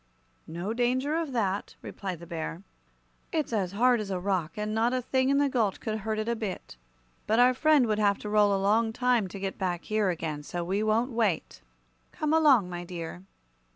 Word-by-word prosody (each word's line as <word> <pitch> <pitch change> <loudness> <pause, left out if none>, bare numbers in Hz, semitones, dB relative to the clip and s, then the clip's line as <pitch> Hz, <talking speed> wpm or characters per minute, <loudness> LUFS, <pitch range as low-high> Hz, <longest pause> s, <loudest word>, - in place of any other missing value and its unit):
"No 175 +6 -4
danger 255 +4 0
of 325 -3 -2
that," 205 -5 -1
replied 190 -4 -5
the - - -8
Bear. 165 +1 -5 0.7
"It's 310 -7 -1
as 195 -4 -1
hard 245 +3 +3
as 210 -2 -4
a 185 -2 -2
rock, 180 -4 -1
and 210 0 -2
not 230 +3 +1
a 255 - 0
thing 260 +1 +1
in 280 - +3
the 285 0 +3
gulch 230 -7 0
could 220 -1 -3
hurt 215 +1 -3
it 215 +1 -2
a 235 - 0
bit. 215 - -6 0.5
But 220 - +2
our 250 +1 +6
friend 300 0 +4
would 215 -2 0
have 200 -1 +3
to - - -3
roll 210 -1 +4
a 200 - +2
long 220 +3 +2
time 245 -4 +2
to 195 +2 -8
get 195 0 -4
back 180 -3 -2
here 215 -2 0
again, 160 -4 -3
so 175 +4 -4
we 190 +4 -1
won't 220 +4 +1
wait. 220 -7 -1 0.5
Come 305 0 -1
along, 285 - +5
my 175 -1 -5
dear." 175 -1 -7
215 Hz, 210 wpm, -28 LUFS, 190-245 Hz, 0.7 s, our